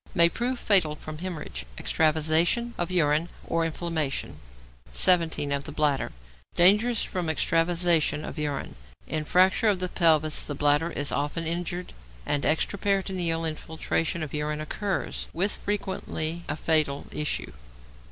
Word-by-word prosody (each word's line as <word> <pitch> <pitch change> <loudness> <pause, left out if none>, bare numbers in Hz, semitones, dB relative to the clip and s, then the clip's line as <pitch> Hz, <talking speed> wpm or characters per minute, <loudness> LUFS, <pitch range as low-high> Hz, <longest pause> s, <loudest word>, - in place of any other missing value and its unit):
= - - -21
May 170 0 +7
prove 245 +7 -2
fatal 185 -10 +3
from 155 0 -9
hæmorrhage, 160 - -5
extravasation 160 - +2
of 175 - -2
urine, 160 -2 +2 0.2
or 165 0 0
inflammation. 160 -3 -2 0.5
17. 160 - +3
=Of 140 0 -1
the 150 - -5
Bladder.= 145 -2 0 0.4
Dangerous 210 +6 +4
from 180 -3 -3
extravasation 165 -1 +2
of - - -7
urine. 145 -2 -3 0.3
In 155 -1 -3
fracture 185 +7 +3
of 205 -3 +3
the 180 0 -2
pelvis 155 -4 +3
the 145 - -5
bladder 145 +3 +2
is 145 -4 -1
often 145 +3 -2
injured, 175 +2 -3 0.3
and 145 - 0
extraperitoneal 185 -1 0
infiltration 160 +1 -2
of 150 - -7
urine 150 0 -2
occurs, 190 +5 -3
with 195 +5 0
frequently 175 -5 -3
a 145 - -1
fatal 155 -3 +1
issue. 150 - -2
165 Hz, 135 wpm, -26 LUFS, 150-180 Hz, 0.5 s, May